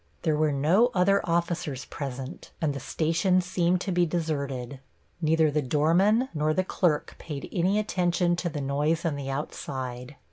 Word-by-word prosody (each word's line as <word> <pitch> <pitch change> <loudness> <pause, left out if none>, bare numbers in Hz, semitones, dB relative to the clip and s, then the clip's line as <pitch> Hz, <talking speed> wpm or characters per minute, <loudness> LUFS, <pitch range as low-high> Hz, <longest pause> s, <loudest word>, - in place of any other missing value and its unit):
There 160 -3 +2
were 155 0 +2
no 165 - +3
other 195 +2 +4
officers 170 -5 -1
present, 135 +1 -6
and 155 -3 0
the 140 - -5
station 170 +7 +1
seemed 180 0 +1
to 195 - -2
be 175 0 +3
deserted. 140 -6 -3 0.4
Neither 160 -1 +3
the 150 +1 +1
doorman 170 - +3
nor 155 0 +1
the 185 - +2
clerk 170 -5 0
paid 145 -3 -6
any 185 +3 +1
attention 180 -4 +1
to 175 0 -1
the 150 -2 -4
noise 150 +5 0
on 160 -3 0
the 140 -1 -5
outside. 130 -2 -5
160 Hz, 165 wpm, -27 LUFS, 140-180 Hz, 0.4 s, other